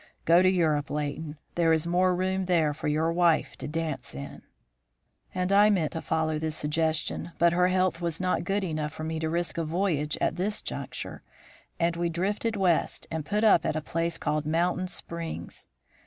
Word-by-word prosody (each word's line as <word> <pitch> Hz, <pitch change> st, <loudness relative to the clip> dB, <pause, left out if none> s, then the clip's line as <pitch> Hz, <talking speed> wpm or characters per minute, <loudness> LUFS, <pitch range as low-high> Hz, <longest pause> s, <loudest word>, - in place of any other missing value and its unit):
Go 170 Hz, +2 st, +6 dB
to 185 Hz, -, +5 dB
Europe, 155 Hz, -5 st, +1 dB
Leighton; 150 Hz, +1 st, -3 dB, 0.2 s
there 165 Hz, -1 st, +3 dB
is 160 Hz, 0 st, +2 dB
more 180 Hz, +1 st, +2 dB
room 190 Hz, +1 st, 0 dB
there 165 Hz, -5 st, +2 dB
for 150 Hz, -, -5 dB
your 160 Hz, +2 st, +1 dB
wife 165 Hz, -4 st, +2 dB
to -, -, -5 dB
dance 155 Hz, -, -4 dB
in.' 70 Hz, 0 st, -8 dB, 0.9 s
"And 180 Hz, +1 st, 0 dB
I 205 Hz, +1 st, +6 dB
meant 175 Hz, -7 st, +1 dB
to 165 Hz, -, -4 dB
follow 160 Hz, -1 st, 0 dB
this 155 Hz, 0 st, -2 dB
suggestion, 160 Hz, +2 st, -1 dB
but 170 Hz, 0 st, +4 dB
her 180 Hz, +1 st, +4 dB
health 185 Hz, -1 st, +1 dB
was 170 Hz, -2 st, -1 dB
not 185 Hz, 0 st, 0 dB
good 195 Hz, +3 st, 0 dB
enough 155 Hz, -4 st, -2 dB
for 155 Hz, -, -7 dB
me 160 Hz, 0 st, -3 dB
to 160 Hz, 0 st, -1 dB
risk 170 Hz, +1 st, -1 dB
a -, -, 0 dB
voyage 160 Hz, -3 st, 0 dB
at 165 Hz, -, 0 dB
this 205 Hz, +4 st, -1 dB
juncture, 130 Hz, -2 st, -6 dB, 0.6 s
and 170 Hz, 0 st, +1 dB
we 170 Hz, 0 st, 0 dB
drifted 205 Hz, +6 st, -1 dB
West 180 Hz, -5 st, +1 dB
and 160 Hz, -1 st, -2 dB
put 210 Hz, +7 st, -1 dB
up 210 Hz, -6 st, +6 dB
at -, -, -1 dB
a -, -, +1 dB
place 165 Hz, +2 st, -2 dB
called 150 Hz, 0 st, -1 dB
Mountain 175 Hz, +3 st, +1 dB
Springs. 170 Hz, -2 st, -5 dB
165 Hz, 190 wpm, -27 LUFS, 155-180 Hz, 0.9 s, Go